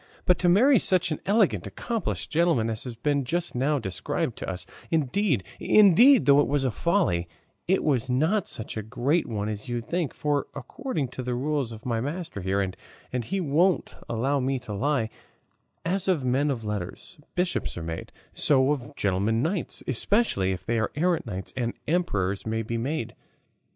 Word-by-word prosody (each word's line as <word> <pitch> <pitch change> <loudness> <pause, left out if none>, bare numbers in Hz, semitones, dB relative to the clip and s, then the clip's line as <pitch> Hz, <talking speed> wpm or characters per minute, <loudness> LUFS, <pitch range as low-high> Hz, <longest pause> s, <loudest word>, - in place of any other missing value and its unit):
But 180 - +3
to 180 - +3
marry 240 +8 +6
such 180 -3 +2
an 155 - -2
elegant 205 0 +2
accomplished 230 -2 -3
gentleman 160 -9 +2
as 110 +3 -2
has 125 -2 -6
been 140 +3 0
just 175 +6 -2
now 140 +4 +1
described 95 -8 -2
to - - -4
us 90 -1 -5 0.2
indeed, 155 - +1 0.2
indeed, 215 - +6
though 140 0 +6
it 145 - +3
was 140 0 +1
a 130 - +1
folly, 165 - +1 0.4
it 190 +2 +2
was 130 -4 +1
not 160 +11 +1
such 110 - -5
a 110 - -2
great 125 +9 0
one 105 -2 -3
as 105 +2 -5
you 120 0 -1
think; 160 +6 -2
for 145 -1 0
according 155 - -4
to 130 - -6
the 125 -1 -2
rules 140 -1 -1
of 110 -1 -10
my 115 -2 0
master 155 - -4
here 95 +2 0
and 110 +5 -6
he 195 +2 -2
won't 175 +3 +2 0.2
allow 130 +5 0
me 135 +1 0
to 110 -4 -7
lie 125 0 0 0.7
as 190 +3 0
of 165 -9 +1
men 135 +4 +2
of 120 -5 -3
letters 105 - -5 0.2
bishops 180 - -1
are 85 - -4
made, 80 0 -5 0.2
so 135 -1 +3
of 145 0 -4
gentlemen 100 +4 +1
knights, 170 +3 -2
specially 130 - +2
if 90 -1 -5
they 115 0 0
be 110 - +2
errant, 170 -2 +1
kings 95 -3 -5
and 120 -2 -2
emperors 100 - 0
may 110 0 -1
be 115 +2 -4
made." 130 -1 -3
135 Hz, 180 wpm, -26 LUFS, 110-170 Hz, 0.7 s, marry